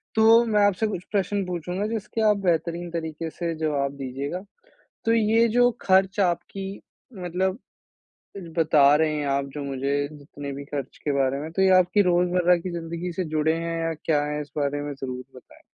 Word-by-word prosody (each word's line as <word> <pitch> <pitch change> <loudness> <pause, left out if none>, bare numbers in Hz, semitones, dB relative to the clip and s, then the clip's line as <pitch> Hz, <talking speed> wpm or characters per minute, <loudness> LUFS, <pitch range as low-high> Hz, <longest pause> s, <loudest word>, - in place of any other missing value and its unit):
तो 225 +1 +6
मैं 210 -2 +2
आपसे 205 +2 +1
कुछ 185 -4 -4
प्रश्न 200 -1 0
पूछूँगा 180 +3 -3
जिसके 220 0 -3
आप 210 - +3
बेहतरीन 170 +1 0
तरीके 160 -1 -4
से 170 0 -3
जवाब 145 -3 0
दीजिएगा। 140 +6 -4 0.6
तो 225 - +3
ये 225 +1 +4
जो 245 +2 +4
खर्च 190 +1 +3
आपकी 190 +2 -1 0.6
मतलब 185 +4 -1 1.0
बता 155 -3 +5
रहे 155 0 +2
हैं 145 - -2
आप 140 0 -1
जो 145 -1 -5
मुझे 140 +1 -1
जितने 145 -1 -8
भी 140 - -8
खर्च 140 -3 -6
के 145 - 0
बारे 135 +1 +1
में 155 +2 -6
तो 190 - -1
ये 190 - +5
आपकी 185 +3 +3
रोज़मर्रा 180 0 +3
की 175 +1 -5
जिंदगी 170 +1 -4
से - - +2
जुड़े 155 +1 +2
हैं 165 0 -3
या 165 0 -1
क्या 150 -2 +2
हैं 150 0 -2
इस 145 - -10
बारे 145 0 0
में 145 0 -4
ज़रूर 130 -2 -6
बताएँ? 125 - -16
170 Hz, 185 wpm, -25 LUFS, 145-190 Hz, 1.0 s, तो